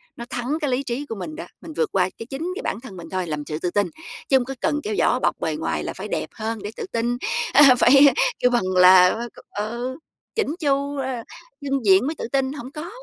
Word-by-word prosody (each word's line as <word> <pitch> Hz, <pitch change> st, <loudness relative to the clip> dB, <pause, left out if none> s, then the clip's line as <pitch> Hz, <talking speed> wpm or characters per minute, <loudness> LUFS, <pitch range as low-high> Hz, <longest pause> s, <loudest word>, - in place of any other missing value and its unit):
nó 235 Hz, -, -7 dB
thắng 255 Hz, +6 st, -2 dB
cái 290 Hz, -, 0 dB
lý 260 Hz, +3 st, 0 dB
trí 260 Hz, +3 st, -3 dB
của 225 Hz, -, -6 dB
mình 310 Hz, +11 st, -6 dB
đó, 330 Hz, -, -7 dB, 0.2 s
mình 320 Hz, -2 st, -9 dB
vượt -, -, 0 dB
qua, 185 Hz, -1 st, +2 dB
cái, 230 Hz, -, -7 dB
chính 275 Hz, +7 st, -5 dB
cái -, -, -5 dB
bản 210 Hz, -, -3 dB
thân 195 Hz, -8 st, -10 dB
mình 170 Hz, -, -9 dB
thôi 185 Hz, -2 st, -2 dB
làm 150 Hz, -1 st, -3 dB
sự 155 Hz, 0 st, -4 dB
tự 175 Hz, 0 st, -2 dB
tin, 205 Hz, -2 st, +1 dB, 0.4 s
chứ 265 Hz, -, +6 dB
hông 245 Hz, -, -1 dB
có 270 Hz, 0 st, -6 dB
cần 295 Hz, -1 st, +1 dB
kéo 425 Hz, 0 st, -2 dB
vỏ -, -, +3 dB
bọc -, -, 0 dB
bề -, -, -1 dB
ngoài -, -, -2 dB
là -, -, -4 dB
phải -, -, -7 dB
đẹp -, -, -3 dB
hơn 225 Hz, 0 st, -4 dB
để 205 Hz, -, -5 dB
tự -, -, -5 dB
tin. 240 Hz, +1 st, -1 dB, 0.4 s
A, 275 Hz, -3 st, +8 dB
phải 275 Hz, +3 st, +7 dB, 0.3 s
kêu 250 Hz, -, +3 dB
bằng 240 Hz, -5 st, +2 dB
là 180 Hz, +1 st, +7 dB
phải 240 Hz, -, -4 dB
c -, -, -17 dB
ừ, 240 Hz, +5 st, -3 dB, 0.4 s
chỉn 445 Hz, -, +1 dB
chu, 280 Hz, -1 st, 0 dB
ờ, 260 Hz, -3 st, -3 dB, 0.4 s
chưng 275 Hz, -4 st, -2 dB
diện 195 Hz, +6 st, +5 dB
mới 315 Hz, -, -2 dB
tự -, -, -5 dB
tin, 270 Hz, 0 st, 0 dB
hổng 265 Hz, -2 st, -8 dB
có. 315 Hz, +4 st, -7 dB
250 Hz, 260 wpm, -23 LUFS, 210-280 Hz, 0.4 s, A